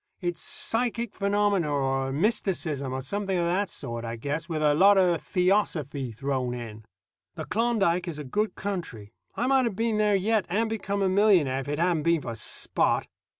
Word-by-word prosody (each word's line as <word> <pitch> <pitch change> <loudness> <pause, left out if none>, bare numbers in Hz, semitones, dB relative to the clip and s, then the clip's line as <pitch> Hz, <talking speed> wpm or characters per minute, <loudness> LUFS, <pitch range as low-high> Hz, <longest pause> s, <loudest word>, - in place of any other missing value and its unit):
It's 175 -2 -3
psychic 235 -1 -2
phenomena, 200 -4 +1
or 135 -1 0
mysticism, 155 - -1
or 130 0 -3
something 195 +7 -2
of 170 - +1
that 185 +3 0
sort, 120 -7 -5
I 115 0 -4
guess, 150 +8 -4
with 155 -2 -1
a 150 -1 +4
lot 195 +6 +6
of 175 -3 +3
theosophy 175 - 0
thrown 130 +1 -2
in. 110 -3 -8 0.5
The - - -5
Klondike 205 -6 +1
is 165 -3 -4
a 150 - -5
good 210 +11 -1
country. 165 - -5 0.2
I 240 - -1
might 265 -1 +3
have 225 -5 -2
been 225 0 0
there 210 -1 +3
yet, 210 +1 +1
and 220 +5 0
become 200 -2 -2
a - - +3
millionaire, 185 -9 +3
if 135 - -6
it 145 +1 -2
hadn't 170 -1 +1
been 170 0 +2
for 115 - -5
Spot. 110 - 0
175 Hz, 185 wpm, -27 LUFS, 140-205 Hz, 0.5 s, lot